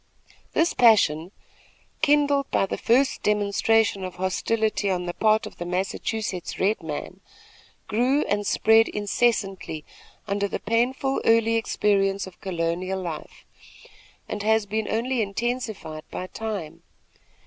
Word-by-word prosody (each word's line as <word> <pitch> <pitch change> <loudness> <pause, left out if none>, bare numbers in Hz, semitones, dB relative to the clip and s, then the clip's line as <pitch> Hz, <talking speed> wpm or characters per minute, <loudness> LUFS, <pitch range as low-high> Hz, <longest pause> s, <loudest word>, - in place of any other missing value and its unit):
This 335 - +2
passion, 185 -8 +4 0.7
kindled 285 -1 +3
by - - +2
the - - -3
first 260 +4 +2
demonstration 210 0 +2
of 185 -1 -6
hostility 205 +3 0
on 180 -2 -1
the 175 - -3
part 215 +2 +2
of - - -10
the - - -4
Massachusetts 190 +1 -3
red 200 +2 +1
man, 160 +4 -6 0.7
grew 250 +7 +2
and 205 0 -1
spread 225 +1 +4
incessantly 200 -6 -1 0.4
under 200 0 0
the - - -3
painful 250 +5 0
early 230 0 +4
experience 200 -3 +1
of 190 -2 -14
colonial 180 +1 -2
life, 170 -4 -7 0.8
and 210 - -4
has 220 0 +2
been 215 +1 -2
only 240 +2 0
intensified 210 -7 -3
by 185 - -5
time. 185 -6 -6
210 Hz, 125 wpm, -25 LUFS, 185-225 Hz, 0.8 s, passion